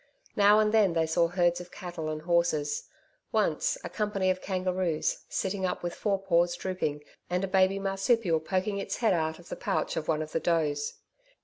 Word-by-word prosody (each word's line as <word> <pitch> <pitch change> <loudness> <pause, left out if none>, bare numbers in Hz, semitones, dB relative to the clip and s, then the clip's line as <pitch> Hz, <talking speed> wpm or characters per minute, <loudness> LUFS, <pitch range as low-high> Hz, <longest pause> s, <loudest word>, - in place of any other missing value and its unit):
Now 205 +1 +6
and 215 0 +3
then, 205 -5 +4
they 165 -1 +2
saw 170 +1 +2
herds 175 0 +1
of 180 - -11
cattle 175 -3 -5
and 155 0 -4
horses. 165 -4 0 0.4
Once, - - +1
a - - -3
company 205 -3 0
of 185 0 -3
kangaroos 185 -3 -1
sitting 190 0 -2
up 180 - -1
with 175 0 -2
fore 200 +1 0
paws 175 -2 +2
drooping 155 -6 -3 0.3
and 180 +1 0
a - - 0
baby 190 0 +3
marsupial 195 -2 +1
poking 190 +5 -1
its - - -3
head 225 -5 +2
out 160 -2 -1
of 175 - -15
the - - -4
pouch - - -1
of 155 - -3
one 155 -1 +1
of 155 - -10
the - - 0
does. 150 -3 0
180 Hz, 195 wpm, -29 LUFS, 165-195 Hz, 0.4 s, Now